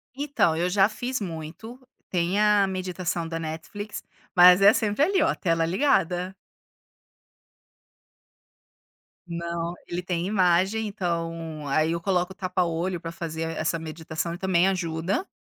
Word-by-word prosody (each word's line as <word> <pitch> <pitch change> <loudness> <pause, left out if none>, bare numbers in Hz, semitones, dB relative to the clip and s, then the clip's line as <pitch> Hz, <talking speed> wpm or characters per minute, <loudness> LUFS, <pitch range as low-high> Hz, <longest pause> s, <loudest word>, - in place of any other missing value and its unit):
Então 280 - +1
eu 175 +2 0
já 195 +1 +4
fiz 250 +4 -3
muito, 175 +7 -7 0.3
tem 180 +2 0
a 210 -2 +4
meditação 180 -2 -3
da 165 0 -4
Netflix, 165 +6 -6 0.3
mas 180 +1 +8
é 200 +2 +8
sempre 220 +3 +1
ali, 380 +4 +2
ó, - - +3
tela 165 -2 +1
ligada. 180 - +1 2.9
Não, 170 0 -3
ele 175 +1 -4
tem 175 -1 -2
imagem, 190 +2 +2
então 165 -5 -4
aí, 155 +3 +2
eu 170 - -1
coloco 180 0 0
o - - -10
tapa 185 -1 -1
olho 170 +1 -2
pra 165 - -5
fazer 165 -1 -5 0.2
essa 160 +1 0
meditação 160 +1 -5
e - - -6
também 190 0 +2
ajuda, 175 - -2
175 Hz, 135 wpm, -25 LUFS, 165-195 Hz, 2.9 s, mas